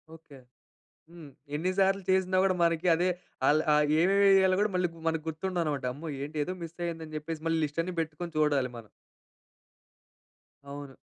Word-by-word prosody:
Okay. 145 -4 -15 0.7
హ్మ్. 165 -4 -11 0.3
ఎన్ని 180 +5 0
సార్లు 195 0 +2
చేసినా 185 0 +2
కూడా, 190 -1 +2
మనకి 170 +1 +1
అదే 180 +2 +1 0.4
ఆళ్ళు 155 +2 +4
ఆహ్, 150 0 +4 0.2
ఏమేమి 200 +2 +4
ఏయాలో 190 -1 +5
కూడా 210 - +2
మళ్ళీ 180 -1 +2 0.2
మనకు 160 -1 0
గుర్తు 160 +4 -4
ఉండదు, 175 -2 -1
అన్నమాట. 145 -4 -2
అమ్మో! 155 +3 -7
ఏంటి 150 +2 -7
ఏదో 185 - -4
మిస్ 165 +1 -9
అయింది 165 -1 -4
అని 155 - -9
చెప్పేసి 155 +1 -6
మళ్ళీ 165 0 +1
లిస్ట్ 150 +3 -2
అన్ని 180 0 -5
పెట్టుకొని 165 +2 -6
చూడాలి 145 -4 +2
మనం. 110 -2 -11 1.8
అవును. 140 -1 -8
165 Hz, 175 wpm, -29 LUFS, 150-185 Hz, 1.8 s, ఏయాలో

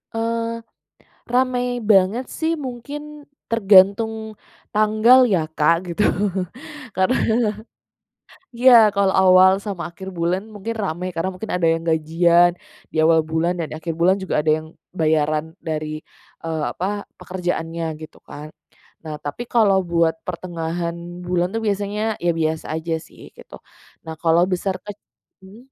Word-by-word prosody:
Eee, 230 0 -1 0.9
ramai 250 0 +1 0.3
banget 205 +5 +4
sih, 320 0 0
mungkin 255 +4 -7 0.5
tergantung 205 0 +5 0.6
tanggal 215 +4 +5
ya 180 - +3 0.2
Kak, 155 +2 +4 0.2
gitu. 190 - -1 0.9
Karena 190 +8 +2 1.4
iya, 255 +1 +6 0.2
kalau 195 -1 +2
awal 185 0 +7
sama 195 -5 -4
akhir 190 +3 -11
bulan 175 +4 0
mungkin 215 +3 -5
ramai 180 0 -3
karena 165 +3 -1
mungkin 210 +4 -7
ada 175 -2 +1
yang 165 0 -3
gajian, 170 +2 +3 0.4
di - - -15
awal 160 0 +5
bulan 165 +2 +1
dan 170 - -2
di - - -5
akhir 165 0 -4
bulan 185 +3 +4
juga 190 - -2
ada 155 - +2
yang 155 0 -9 0.3
bayaran 155 0 0
dari, 155 -1 -2 0.6
eee, 160 -1 -3
apa, 200 +3 -4
pekerjaannya 170 -2 -4 0.2
gitu 155 - -11
kan. 150 +1 -9 0.6
Nah, 155 -2 -6
tapi 145 +12 -4
kalau 210 -5 +4
buat 165 -1 +2
pertengahan 170 -1 -4 0.3
bulan 175 0 0
tuh 225 - -1
biasanya, 205 +1 -2 0.2
ya 175 - +4
biasa 160 0 -1
aja 160 +1 -3
sih - - -18 0.2
gitu. - - -13 0.5
Nah 160 0 -6
kalau 165 +1 +4
besar 185 +1 -2
kecil 205 +3 -15
180 Hz, 135 wpm, -21 LUFS, 165-210 Hz, 1.4 s, awal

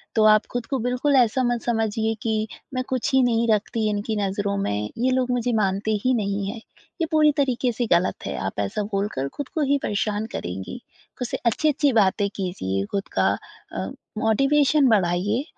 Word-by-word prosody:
तो 220 - +4
आप 215 0 +6
ख़ुद 245 -1 -2
को 270 - -1
बिल्कुल 250 +4 +1
ऐसा 255 0 +3
मत 240 -1 0
समझिए 225 -1 0
कि 220 -1 0 0.3
मैं 255 - 0
कुछ 255 0 -1
ही 265 - +5
नहीं 235 -1 +2
रखती 215 +1 -1
इनकी 210 +1 -2
नज़रों 200 0 -1
में, 105 - -1
ये 255 +2 +1
लोग 255 -1 +1
मुझे 245 0 0
मानते 200 +1 0
ही 255 - +4
नहीं 200 -2 -1
हैं। 225 0 -8 0.4
ये 325 - +1
पूरी 305 -1 +5
तरीके 255 -3 +1
से 240 +1 -1
ग़लत 175 +2 +1
है - - -3
आप 95 +1 -4
ऐसा 100 - -1
बोलकर 195 -9 -1
ख़ुद 285 -3 -3
को 315 - +1
ही 285 - +4
परेशान 210 +1 -1
करेंगी। 95 - -5 0.4
ख़ुद 250 - -2
से - - -3
अच्छी-अच्छी 285 +3 +2
बातें 205 -1 +3
कीजिए, 100 - -2
ख़ुद 200 0 -1
का - - +4 0.5
अ, - - -2 0.3
मोटिवेशन 275 +5 +3
बढ़ाइए 200 +3 +2
220 Hz, 185 wpm, -24 LUFS, 200-250 Hz, 0.5 s, आप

